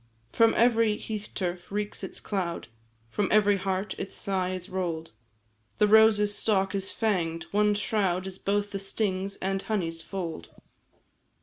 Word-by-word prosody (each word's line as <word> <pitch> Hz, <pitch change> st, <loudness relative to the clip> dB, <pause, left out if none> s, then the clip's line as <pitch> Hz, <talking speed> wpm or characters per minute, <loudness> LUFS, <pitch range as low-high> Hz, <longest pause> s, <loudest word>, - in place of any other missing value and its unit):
"From 230 Hz, 0 st, +4 dB
every 230 Hz, -2 st, +4 dB
hearth 215 Hz, -1 st, -5 dB
turf 180 Hz, -1 st, -3 dB
reeks 205 Hz, 0 st, -3 dB
its 190 Hz, -, -6 dB
cloud, 175 Hz, -, -3 dB, 0.4 s
From 205 Hz, -, 0 dB
every 205 Hz, -1 st, +5 dB
heart 190 Hz, +1 st, -2 dB
its 195 Hz, -, -5 dB
sigh 190 Hz, -2 st, -1 dB
is 185 Hz, -1 st, -5 dB
roll'd; 170 Hz, -4 st, -3 dB, 0.7 s
The 210 Hz, -, +4 dB
rose's 210 Hz, -1 st, +6 dB
stalk 195 Hz, -3 st, +1 dB
is 195 Hz, -1 st, -1 dB
fang'd 170 Hz, -7 st, 0 dB
one 210 Hz, 0 st, +3 dB
shroud 195 Hz, -4 st, 0 dB
Is 190 Hz, 0 st, -6 dB
both 205 Hz, +1 st, 0 dB
the 200 Hz, -, -3 dB
sting's 195 Hz, -1 st, -2 dB
and 195 Hz, 0 st, -2 dB
honey's 170 Hz, -7 st, -2 dB
fold. 165 Hz, -, -5 dB
195 Hz, 145 wpm, -28 LUFS, 185-210 Hz, 0.7 s, rose's